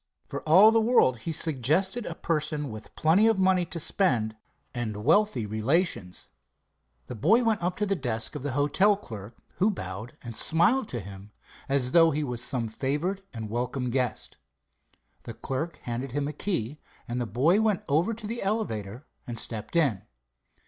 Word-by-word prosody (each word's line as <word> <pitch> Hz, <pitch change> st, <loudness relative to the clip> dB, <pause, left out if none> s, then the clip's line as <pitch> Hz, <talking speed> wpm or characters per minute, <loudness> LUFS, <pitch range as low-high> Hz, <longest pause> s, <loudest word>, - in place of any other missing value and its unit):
For -, -, -5 dB
all 195 Hz, +7 st, +8 dB
the 225 Hz, 0 st, +3 dB
world, 220 Hz, -, +3 dB
he 165 Hz, -, -4 dB
suggested 160 Hz, -, +1 dB
a 165 Hz, -, -5 dB
person 150 Hz, -4 st, -2 dB
with 110 Hz, 0 st, -10 dB
plenty 175 Hz, +8 st, +4 dB
of 225 Hz, -2 st, +3 dB
money 185 Hz, -1 st, +3 dB
to 170 Hz, +1 st, -4 dB
spend 120 Hz, -, 0 dB, 0.4 s
and 110 Hz, -4 st, -4 dB
wealthy 165 Hz, -, +3 dB
relations. 110 Hz, -, -1 dB, 0.8 s
The -, -, -7 dB
boy 195 Hz, -, +3 dB
went 225 Hz, -4 st, +1 dB
up 180 Hz, +1 st, -1 dB
to 210 Hz, -, 0 dB
the 195 Hz, -1 st, 0 dB
desk 115 Hz, -, -2 dB
of 150 Hz, -, -5 dB
the 140 Hz, -1 st, -3 dB
hotel 165 Hz, +9 st, +3 dB
clerk, 110 Hz, -, -10 dB, 0.2 s
who 200 Hz, +4 st, +3 dB
bowed 100 Hz, -, -6 dB
and 115 Hz, -2 st, -7 dB
smiled 180 Hz, -, +2 dB
to 120 Hz, -, -4 dB
him 100 Hz, +1 st, -11 dB, 0.4 s
as 135 Hz, -2 st, +1 dB
though 165 Hz, +1 st, +6 dB
he 150 Hz, 0 st, -1 dB
was 125 Hz, -3 st, -2 dB
some 120 Hz, -3 st, -1 dB
favored 145 Hz, -, -2 dB
and 110 Hz, -3 st, -6 dB
welcome 125 Hz, +3 st, -2 dB
guest. 125 Hz, -2 st, -2 dB, 0.8 s
The -, -, -8 dB
clerk 145 Hz, +6 st, -4 dB
handed 120 Hz, +2 st, -4 dB
him 145 Hz, 0 st, -1 dB
a 150 Hz, -, -4 dB
key, 150 Hz, -, -3 dB, 0.3 s
and 120 Hz, +1 st, -2 dB
the 120 Hz, -, -2 dB
boy 150 Hz, -, +3 dB
went 215 Hz, -4 st, +1 dB
over 160 Hz, +9 st, +2 dB
to 220 Hz, -1 st, -10 dB
the 230 Hz, +3 st, -4 dB
elevator 130 Hz, -, -3 dB, 0.2 s
and 120 Hz, -1 st, -5 dB
stepped 110 Hz, +5 st, -5 dB
in. 135 Hz, -, +2 dB
145 Hz, 175 wpm, -27 LUFS, 120-185 Hz, 0.8 s, all